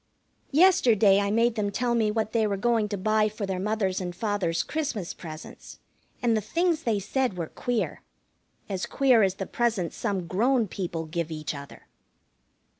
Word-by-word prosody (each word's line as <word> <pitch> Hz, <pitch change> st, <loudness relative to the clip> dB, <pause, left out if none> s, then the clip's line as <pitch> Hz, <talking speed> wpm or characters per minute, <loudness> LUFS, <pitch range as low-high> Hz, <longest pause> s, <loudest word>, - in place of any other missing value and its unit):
Yesterday 235 Hz, -, +5 dB
I 200 Hz, 0 st, 0 dB
made 230 Hz, +3 st, +3 dB
them 210 Hz, -3 st, -1 dB
tell 245 Hz, +2 st, 0 dB
me 225 Hz, -2 st, +2 dB
what 220 Hz, 0 st, -1 dB
they 220 Hz, -2 st, +2 dB
were 200 Hz, -1 st, -1 dB
going 225 Hz, 0 st, +1 dB
to 205 Hz, -, -2 dB
buy 215 Hz, +2 st, +2 dB
for 210 Hz, -1 st, -5 dB
their 190 Hz, -1 st, -3 dB
mother's 195 Hz, -2 st, -1 dB
and 175 Hz, -1 st, -5 dB
father's 200 Hz, -6 st, -1 dB
Christmas 250 Hz, -, -3 dB
presents, 155 Hz, -1 st, -10 dB, 0.5 s
and 235 Hz, -2 st, +3 dB
the 215 Hz, -, +1 dB
things 330 Hz, -, 0 dB
they 230 Hz, -7 st, 0 dB
said 210 Hz, +1 st, -1 dB
were 165 Hz, -3 st, -3 dB
queer. 245 Hz, -2 st, -2 dB, 0.7 s
As 190 Hz, -2 st, -3 dB
queer 260 Hz, -5 st, +4 dB
as 190 Hz, -2 st, +2 dB
the 195 Hz, -, -4 dB
presents 225 Hz, -8 st, -1 dB
some 200 Hz, -6 st, -2 dB
grown 230 Hz, +6 st, +2 dB
people 170 Hz, -4 st, -4 dB
give 170 Hz, 0 st, -3 dB
each 155 Hz, -1 st, -4 dB
other. 140 Hz, -1 st, -10 dB
210 Hz, 175 wpm, -26 LUFS, 185-235 Hz, 0.7 s, Yesterday